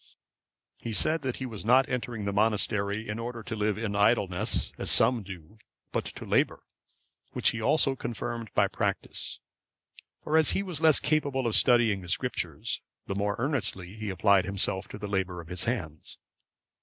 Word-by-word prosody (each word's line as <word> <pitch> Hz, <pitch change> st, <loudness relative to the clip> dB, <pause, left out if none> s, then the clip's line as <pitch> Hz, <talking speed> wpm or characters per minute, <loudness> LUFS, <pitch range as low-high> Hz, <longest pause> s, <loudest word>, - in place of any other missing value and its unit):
He 115 Hz, -, -4 dB
said 155 Hz, +8 st, +2 dB
that 130 Hz, -3 st, -2 dB
he 130 Hz, -, -5 dB
was 110 Hz, -7 st, -6 dB
not 130 Hz, +4 st, +5 dB
entering 120 Hz, -4 st, -3 dB
the 100 Hz, -, -1 dB
monastery 105 Hz, 0 st, +1 dB
in 105 Hz, +2 st, -4 dB
order 115 Hz, 0 st, -5 dB
to 110 Hz, -, -5 dB
live 105 Hz, -1 st, 0 dB
in 110 Hz, -2 st, -3 dB
idleness, 100 Hz, -3 st, +2 dB
as -, -, -2 dB
some 125 Hz, -2 st, +4 dB
do, 95 Hz, +1 st, -11 dB, 0.3 s
but -, -, -1 dB
to -, -, -8 dB
labour; -, -, +1 dB, 0.7 s
which -, -, +2 dB
he 115 Hz, -, -5 dB
also 135 Hz, +3 st, +3 dB
confirmed 120 Hz, -2 st, -5 dB
by -, -, +4 dB
practice; -, -, -2 dB, 0.8 s
for 155 Hz, +1 st, +2 dB
as 160 Hz, -, +4 dB
he 195 Hz, -, 0 dB
was 175 Hz, -6 st, -4 dB
less 160 Hz, -2 st, +6 dB
capable 145 Hz, -4 st, 0 dB
of 115 Hz, -, +1 dB
studying 120 Hz, -5 st, +5 dB
the 90 Hz, -, -8 dB
Scriptures, -, -, -2 dB, 0.2 s
the -, -, -3 dB
more 100 Hz, +1 st, -1 dB
earnestly 110 Hz, -, -1 dB
he 110 Hz, -1 st, -5 dB
applied 100 Hz, 0 st, +3 dB
himself 95 Hz, 0 st, -1 dB
to -, -, -8 dB
the 105 Hz, -, -5 dB
labour 95 Hz, -3 st, -2 dB
of 85 Hz, -1 st, -10 dB
his 90 Hz, -1 st, -2 dB
hands. 85 Hz, -, -3 dB
110 Hz, 175 wpm, -28 LUFS, 100-125 Hz, 0.8 s, less